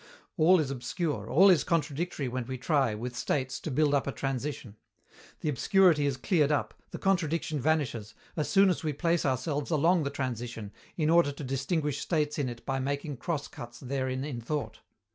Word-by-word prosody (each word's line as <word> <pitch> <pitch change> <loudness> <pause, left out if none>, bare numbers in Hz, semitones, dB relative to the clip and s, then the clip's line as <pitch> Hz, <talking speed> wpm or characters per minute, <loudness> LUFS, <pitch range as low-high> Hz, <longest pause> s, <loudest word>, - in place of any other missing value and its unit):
All 180 +2 +5
is 145 -4 -1
obscure, 130 - -3
all 190 +6 +7
is 160 -6 +4
contradictory 160 -2 -1
when 125 -1 -4
we 130 0 -4
try, 130 -4 +1
with 120 +3 -5
states, 130 -1 -1
to - - -5
build 145 +1 +2
up 140 -1 +1
a - - 0
transition. 135 -4 -4 0.7
The 155 - -1
obscurity 160 - +4
is 135 -2 -1
cleared 150 +1 +2
up, 150 - 0 0.2
the - - -6
contradiction 165 -5 0
vanishes, 130 -8 -1 0.2
as 155 - -1
soon 195 -1 +5
as 175 - -3
we 155 -2 -1
place 165 +1 +1
ourselves 140 +3 -1
along 165 +2 +3
the 140 - -1
transition, 120 -6 -4 0.3
in 155 -2 +2
order 170 -4 +5
to 140 - -8
distinguish 140 +2 -1
states 150 -3 0
in 135 -3 0
it 120 -1 -9
by 135 -1 -1
making 140 +1 -3
cross 155 +1 -3
cuts 120 0 -10
therein 130 0 -2
in 135 -5 -5
thought. 145 +5 -4
145 Hz, 185 wpm, -29 LUFS, 130-160 Hz, 0.7 s, all